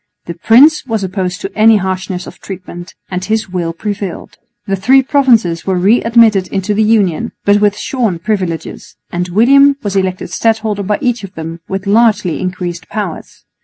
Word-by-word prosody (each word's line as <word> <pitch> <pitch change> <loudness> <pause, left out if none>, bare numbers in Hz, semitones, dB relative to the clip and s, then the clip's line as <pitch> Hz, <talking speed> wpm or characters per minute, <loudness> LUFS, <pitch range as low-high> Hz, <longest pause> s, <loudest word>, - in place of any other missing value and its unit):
The 170 - -5
prince 255 - +4
was 220 -4 -2
opposed 185 -1 -3
to 195 - -6
any 220 0 +5
harshness 185 -1 -3
of - - -12
treatment, 180 -2 -9 0.2
and 180 0 -3
his 215 0 -2
will 175 -2 -2
prevailed. 200 +1 -6 0.3
The 195 - -1
three 255 +8 +3
provinces 235 - +2
were 190 -1 +1
re 200 +7 +3
admitted 225 -5 +3
into 195 +2 -2
the 210 - +1
Union, 215 -1 +1
but 205 0 +3
with 205 -1 +2
shorn 230 -9 -2
privileges; 180 -3 -4 0.2
and 175 +1 -2
William 275 +8 +4
was 200 -1 -3
elected 185 -2 -2
stadholder 220 0 0
by 205 +2 -1
each 245 -4 -1
of 195 0 -10
them 165 +1 -7
with 195 0 -4
largely 210 -4 +2
increased 180 -2 -5
powers. 205 -6 -6
200 Hz, 170 wpm, -14 LUFS, 180-225 Hz, 0.3 s, any